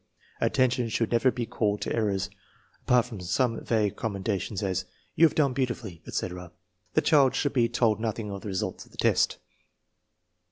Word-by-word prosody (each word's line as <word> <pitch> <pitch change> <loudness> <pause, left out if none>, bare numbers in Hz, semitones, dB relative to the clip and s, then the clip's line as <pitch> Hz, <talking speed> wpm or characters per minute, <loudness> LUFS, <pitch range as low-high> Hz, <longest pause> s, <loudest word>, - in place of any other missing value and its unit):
Attention 125 -2 +2
should 115 0 0
never 120 +2 +4
be 120 -2 -2
called 105 -2 0
to - - -2
errors. 100 -3 0 0.6
Apart 125 -1 +5
from 115 -5 -8
such 90 - -7
some 120 -1 +1
vague 105 -4 +1
commenda 100 -3 -2
tion 100 - -6
as 95 -2 -1
" - - -37
You 165 - +7
have - - -7
done 140 -4 +3
beautifully," 120 -9 -3
etc., 90 -1 -4 0.4
the 155 - +5
child 145 -3 +4
should 145 - 0
be 120 -4 +3
told 110 -3 +2
nothing 110 -2 -3
of 100 -1 -6
the - - -7
result 95 -2 -3
of - - -21
the - - -18
test. - - +2
115 Hz, 190 wpm, -27 LUFS, 100-125 Hz, 0.6 s, You